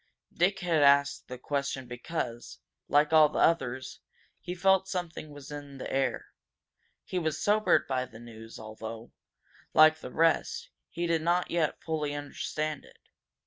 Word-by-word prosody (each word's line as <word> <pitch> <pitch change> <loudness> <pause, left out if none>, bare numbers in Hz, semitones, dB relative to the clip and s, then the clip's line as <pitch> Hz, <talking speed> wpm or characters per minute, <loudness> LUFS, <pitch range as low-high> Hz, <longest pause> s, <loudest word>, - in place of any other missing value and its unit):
Dick 190 +3 +1
had 170 -4 +2
asked 140 0 +4
the 125 - -7
question 140 0 -3
because, 125 -1 -5 0.3
like 150 +2 +3
all 155 -1 +7
the - - -5
others, 130 -6 +1 0.4
he 180 - -6
felt 190 +1 +3
something 175 -4 -4
that 150 - -13
was 145 0 -11
in 145 -1 -8
the - - -6
air. 135 0 -1 0.7
He 185 - -3
was 160 -3 -2
sobered 215 0 +3
by 130 -1 -1
the 110 - -14
news, 115 -1 -11
although, 110 +1 -8 0.6
like 155 0 +7
the 125 - -8
rest, 165 +2 +1 0.2
he 170 +1 -3
did 165 -1 +1
not 175 +2 +1
yet 165 -3 0
fully 150 -2 -2
understand 150 +1 -4
it. - - -19
150 Hz, 155 wpm, -29 LUFS, 130-170 Hz, 0.7 s, all